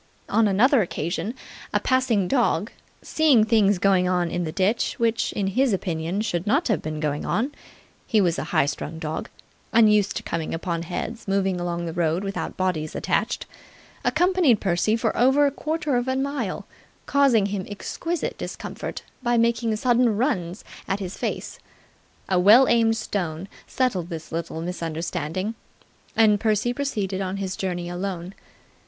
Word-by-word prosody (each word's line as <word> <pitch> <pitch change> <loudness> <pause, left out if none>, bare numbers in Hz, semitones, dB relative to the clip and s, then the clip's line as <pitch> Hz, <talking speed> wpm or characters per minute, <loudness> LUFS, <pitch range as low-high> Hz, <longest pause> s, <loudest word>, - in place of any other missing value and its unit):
On 225 -1 +3
another 230 +6 +4
occasion, 185 - -3 0.4
a - - +2
passing 255 -7 +1
dog, 235 -4 +1 0.3
seeing 295 -8 +4
things 215 -3 +3
going 180 -1 +3
on 175 -2 +1
in 175 0 -1
the 155 - -3
ditch 190 +7 0
which 230 -1 +1
in 200 - -1
his 245 +5 +2
opinion 175 0 -2
should 195 -4 -2
not 275 +7 +2
have 210 -8 +1
been 155 0 -4
going 150 -1 -1
on 250 +7 0 0.6
he 220 - +3
was 175 -4 +2
a - - -3
high 140 - +2
strung 145 +3 -4
dog, 160 -1 -4 0.4
unused 210 -3 +4
to - - -5
coming 165 -1 -3
upon 170 0 -3
heads 215 +7 -5
moving 195 -2 +1
along 175 0 -2
the 165 - -4
road 170 +1 0
without 195 0 -4
bodies 170 -5 -1
attached - - -1 0.6
accompanied 355 - +3
Percy 190 +3 +1
for 230 - -1
over 265 +4 +4
a 280 - +2
quarter 305 -1 -2
of 245 +1 0
a 260 - 0
mile, 270 -7 -2 0.4
causing 270 -7 +4
him 195 -2 -3
exquisite 330 - -4
discomfort - - -6 0.2
by 240 -1 +1
making 230 -1 +2
sudden 240 -1 +2
runs 195 - -1 0.2
at 195 +1 -1
his 190 -2 -5
face. - - -4 0.7
A 185 -2 +2
well 220 +8 +7
aimed 225 -1 +3
stone 185 -5 -3 0.2
settled 195 -10 -1
this 165 -2 -7
little 165 -1 -4
misunderstanding, 170 +2 -3 0.6
and 215 -2 +5
Percy 220 +2 +1
proceeded 205 -9 -2
on 190 0 -3
his 190 -1 -3
journey 175 -2 -3
alone. 180 0 -4
200 Hz, 160 wpm, -24 LUFS, 175-235 Hz, 0.7 s, well